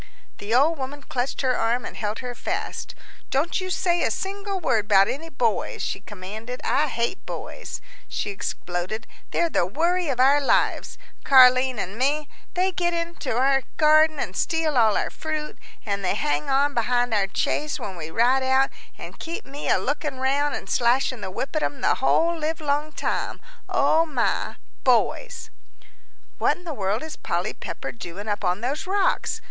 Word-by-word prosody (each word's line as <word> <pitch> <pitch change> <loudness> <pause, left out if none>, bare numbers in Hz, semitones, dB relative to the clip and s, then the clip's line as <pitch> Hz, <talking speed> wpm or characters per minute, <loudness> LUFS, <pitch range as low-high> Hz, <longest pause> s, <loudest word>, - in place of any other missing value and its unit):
The 205 +2 -6
old 300 +4 +4
woman 280 +2 -5
clutched 255 +1 -2
her 260 -2 +2
arm 235 +2 0
and - - -7
held 215 +3 -3
her 245 - -4
fast. - - -4 0.3
"Don't 315 +8 0
you 370 - -4
say 350 -1 +1
a - - +2
single 395 0 -3
word 225 - +1
about 195 -2 +5
any 325 +4 -4
boys," 240 -7 -1
she - - -2
commanded. 210 +5 -7
"I 300 +2 +2
hate 235 +7 -2
boys," - - -6 0.3
she 205 - -3
exploded, 185 +2 -4 0.2
"they're 340 - +1
the 175 - +1
worry 340 - +1
of 255 -3 -1
our 275 +3 +5
lives, - - +1 0.3
Car'line 255 -1 +6
and 200 +2 -4
mine, 295 +3 +1 0.3
they 370 +1 +2
get 345 -1 0
into 335 -8 -3
our 270 +1 +3 0.2
garden, 310 0 +5
and 190 -8 -3
steal 320 - 0
all 225 -4 +4
our - - -1
fruit, 310 -1 -4 0.3
and 200 -2 -2
they 180 - +1
hang 145 +1 0
on 280 +2 +3
behind 245 0 +1
our 200 -2 +2
chaise 300 +7 -1
when 190 - -5
we 160 -2 -6
ride 245 +8 +3
out, 265 +1 +3 0.3
and - - -10
keep 330 +1 -5
me 280 +2 -5
a - - +5
lookin' 290 0 -2
round 280 +2 +1
an' - - -5
slashin' 245 0 +2
the 190 - -4
whip 265 - -4
at 310 - +1
'em 280 -3 -2
the - - +2
whole 330 +5 +3
livelong 305 -1 -1
time; - - -2 0.3
O 325 +1 +3
my 255 -6 0 0.3
boys!" - - +1 0.9
"What - - +2
in 355 - -16
the 335 -3 -5
world 205 0 -1
is 315 -1 -6
Polly - - -2
Pepper - - -6
doing 200 -1 -8
up 205 -1 -2
on 180 +2 0
those 275 +9 -2
rocks?" 405 +3 +1
270 Hz, 175 wpm, -24 LUFS, 225-315 Hz, 0.9 s, Car'line